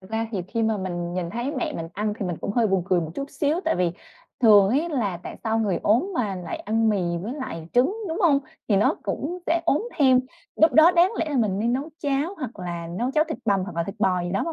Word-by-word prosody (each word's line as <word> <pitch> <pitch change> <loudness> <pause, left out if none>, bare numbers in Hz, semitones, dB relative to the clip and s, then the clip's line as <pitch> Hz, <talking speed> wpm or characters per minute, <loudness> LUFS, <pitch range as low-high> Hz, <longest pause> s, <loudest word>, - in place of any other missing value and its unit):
Thật 190 - -15
ra 225 0 -1
thì 190 -4 -2
khi 230 +1 -1
mà 220 -1 +1
mình 175 -2 -4
nhìn 175 -2 -3
thấy 240 +6 -3
mẹ - - -2
mình 165 0 -5
ăn 210 +1 -2
thì 195 - -2
mình 175 - -3
cũng - - -3
hơi 230 0 +3
buồn 190 -3 +1
cười 185 -2 +2
một 160 -2 -4
chút 280 0 -5
xíu, 300 +4 0
tại - - +1
vì 180 -2 +1 0.5
thường 205 -4 +7
ấy 290 +10 +1
là 225 - -1
tại - - -8
sao 225 0 +1
người 200 -6 0
ốm 240 - +2
mà 210 -9 -1
lại 180 - -5
ăn 225 +2 0
mì 205 -3 +2 0.2
với 220 +5 -4
lại 165 - -6
trứng, 260 +11 +3
đúng 325 - -3
hông? 300 -6 +5 0.3
Thì 205 - +3
nó 205 - +3
cũng 345 +6 -3
sẽ 335 +1 +2
ốm 415 - +1
thêm. 260 -3 +5 0.4
Lúc 320 0 +5
đó 315 +3 +7
đáng 355 +3 +4
lẽ - - 0
là 285 - -1
mình 210 -6 +1
nên 230 +3 +1
nấu 280 +5 -2
cháo 290 +5 -1
hoặc 255 - -6
là 170 -2 -5
nấu 245 +3 0
cháo 305 +2 +3
thịt 315 - -4
bằm 200 -3 +2
hoặc 180 -4 -8
là 170 - +1
thịt 195 +4 -6
bò 185 -3 +2
gì 175 - -3
đó, 200 - 0
mà 335 - -3
225 Hz, 275 wpm, -24 LUFS, 190-280 Hz, 0.5 s, thường